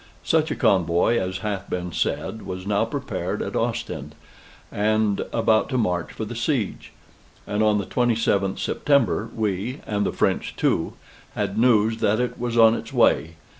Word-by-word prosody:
Such 160 Hz, -1 st, +2 dB
a -, -, -2 dB
convoy 95 Hz, 0 st, +2 dB
as 95 Hz, 0 st, -3 dB
hath 100 Hz, -2 st, -3 dB
been 90 Hz, -1 st, -3 dB
said 110 Hz, +6 st, -2 dB
was 95 Hz, 0 st, -6 dB
now 100 Hz, 0 st, +1 dB
prepared -, -, -3 dB
at -, -, -5 dB
Ostend, -, -, -3 dB, 0.6 s
and 105 Hz, -1 st, +1 dB
about 110 Hz, 0 st, +2 dB
to 130 Hz, -, -1 dB
march 90 Hz, -7 st, -1 dB
for 110 Hz, -, -5 dB
the 120 Hz, +3 st, -7 dB
siege; 115 Hz, -2 st, -2 dB, 0.5 s
and 105 Hz, +1 st, -1 dB
on 105 Hz, -1 st, +3 dB
the 100 Hz, -, -2 dB
27th 115 Hz, -5 st, +1 dB
September 120 Hz, -6 st, +1 dB
we 110 Hz, +4 st, -2 dB
(and 105 Hz, -1 st, -1 dB
the -, -, 0 dB
French -, -, -1 dB
too) -, -, 0 dB, 0.4 s
had 100 Hz, -2 st, -2 dB
news 110 Hz, -1 st, +3 dB
that 110 Hz, 0 st, +1 dB
it 125 Hz, 0 st, -2 dB
was 120 Hz, -1 st, -2 dB
on 115 Hz, -1 st, +7 dB
its -, -, -5 dB
way. 80 Hz, +1 st, +2 dB
110 Hz, 165 wpm, -23 LUFS, 100-115 Hz, 0.6 s, on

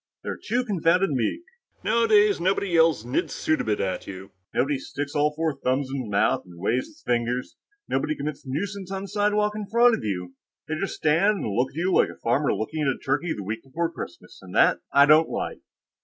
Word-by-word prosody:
"They're -, -, -5 dB
too 245 Hz, +3 st, 0 dB
confounded 185 Hz, -3 st, +2 dB
meek. 135 Hz, -, -1 dB, 0.4 s
Nowadays, 210 Hz, -4 st, +4 dB
nobody 190 Hz, +2 st, +1 dB
yells 165 Hz, -8 st, +3 dB
'Znidd 125 Hz, -, -1 dB
suddabit!' 110 Hz, -9 st, 0 dB
at 95 Hz, -1 st, -2 dB
you. 95 Hz, 0 st, -8 dB, 0.2 s
Nobody 140 Hz, 0 st, 0 dB
sticks 145 Hz, +2 st, -5 dB
all 150 Hz, 0 st, +2 dB
four 160 Hz, -1 st, 0 dB
thumbs 130 Hz, +1 st, -1 dB
in 140 Hz, -, -2 dB
his 115 Hz, -, -7 dB
mouth 100 Hz, -, +2 dB
and 90 Hz, -2 st, -15 dB
waves 110 Hz, +8 st, 0 dB
his 315 Hz, 0 st, -20 dB
fingers. 120 Hz, +1 st, -1 dB, 0.3 s
Nobody 150 Hz, +3 st, 0 dB
commits 145 Hz, 0 st, -5 dB
nuisance 190 Hz, +8 st, -4 dB
on 195 Hz, 0 st, -3 dB
the -, -, -6 dB
sidewalk 210 Hz, +1 st, +1 dB
in 210 Hz, -1 st, -5 dB
front 235 Hz, +3 st, +5 dB
of 225 Hz, -, -2 dB
you. 90 Hz, -4 st, -3 dB, 0.3 s
They 155 Hz, -, -3 dB
just 155 Hz, -, -3 dB
stand 180 Hz, +7 st, +2 dB
and 105 Hz, -, -2 dB
look 125 Hz, +2 st, +1 dB
at -, -, -20 dB
you 180 Hz, +3 st, 0 dB
like -, -, +4 dB
a -, -, -9 dB
farmer 130 Hz, +5 st, +1 dB
looking 155 Hz, +8 st, -3 dB
at 150 Hz, -, +1 dB
a 135 Hz, -, +1 dB
turkey 145 Hz, +5 st, -1 dB
the 100 Hz, -, -6 dB
week 110 Hz, +4 st, -4 dB
before 165 Hz, +6 st, -3 dB
Christmas, -, -, -9 dB
and -, -, -11 dB
that -, -, +5 dB
I 140 Hz, -, +7 dB
don't 155 Hz, +2 st, +5 dB
like!" -, -, -4 dB
150 Hz, 210 wpm, -25 LUFS, 125-195 Hz, 0.4 s, I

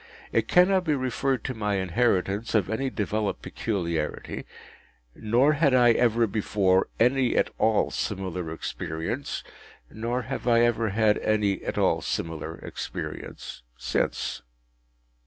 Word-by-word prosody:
It -, -, +1 dB
cannot 185 Hz, +1 st, +4 dB
be 155 Hz, -4 st, +1 dB
referred 130 Hz, 0 st, -1 dB
to 130 Hz, -, -3 dB
my 105 Hz, -3 st, -1 dB
inheritance 95 Hz, +2 st, 0 dB
of 105 Hz, -2 st, +2 dB
any 135 Hz, +5 st, -1 dB
developed 105 Hz, -2 st, -2 dB
peculiarity, 85 Hz, -8 st, -3 dB, 0.7 s
nor 120 Hz, +7 st, +3 dB
had 145 Hz, -3 st, +3 dB
I 120 Hz, -1 st, +6 dB
ever 115 Hz, 0 st, +3 dB
before 100 Hz, -3 st, +1 dB
any 125 Hz, +1 st, +3 dB
at -, -, +2 dB
all 110 Hz, 0 st, +2 dB
similar 90 Hz, -5 st, -3 dB
experience, 80 Hz, -, -4 dB, 0.5 s
nor 120 Hz, +3 st, -2 dB
have 130 Hz, +2 st, -5 dB
I 115 Hz, -1 st, +5 dB
ever 115 Hz, -2 st, +2 dB
had 105 Hz, +1 st, +2 dB
any 105 Hz, -2 st, +1 dB
at -, -, -3 dB
all -, -, +2 dB
similar 80 Hz, -1 st, -3 dB
experience -, -, -6 dB, 0.2 s
since. -, -, -1 dB
110 Hz, 125 wpm, -26 LUFS, 95-125 Hz, 0.7 s, I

